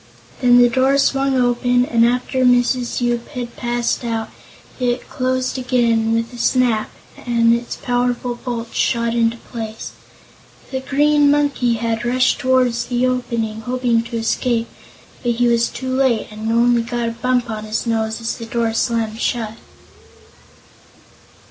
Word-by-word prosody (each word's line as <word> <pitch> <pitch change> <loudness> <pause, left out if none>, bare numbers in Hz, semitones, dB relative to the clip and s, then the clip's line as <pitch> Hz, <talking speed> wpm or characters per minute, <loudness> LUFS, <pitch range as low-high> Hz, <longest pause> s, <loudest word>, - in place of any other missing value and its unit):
Then 245 -2 +5
the 245 0 +7
door 260 +3 +2
swung 275 -1 +2
open 245 0 +2
and 230 -2 +2
after 250 +2 0
Mrs. 245 0 +2
Yoop 240 -1 -1
had 245 -4 -6
passed 240 +1 -1
out 225 -2 -3 0.5
it 245 -1 -1
closed 255 -1 -1
again 235 -3 +1
with 230 +1 -2
a 240 - -9
snap 240 -4 +1 0.3
as - - -16 0.3
its 235 0 -2
powerful 245 0 -1
bolts 240 -1 -6
shot 235 -1 +1
into 230 0 +1
place. 225 -2 -7 0.8
The 265 - -2
Green 290 +2 +3
Monkey 285 -4 +2
had 230 0 -2
rushed 255 +1 +2
toward 255 -1 +2
the 240 +1 -1
opening, 235 -3 -2
hoping 245 -1 0
to 235 0 -5
escape, 230 +1 0 0.5
but 240 -1 0
he 240 +1 +1
was 235 0 +2
too 260 0 -5
late 260 -4 +1
and 215 +1 -4
only 235 +1 +3
got 235 0 -2
a - - -4
bump 245 +1 0
on 215 0 -5
his 215 +2 -3
nose 220 -1 -1
as 230 0 -3
the 230 - -7
door 230 -1 -1
slammed 225 -1 -1
shut. 225 -3 -1
240 Hz, 150 wpm, -19 LUFS, 230-255 Hz, 0.8 s, the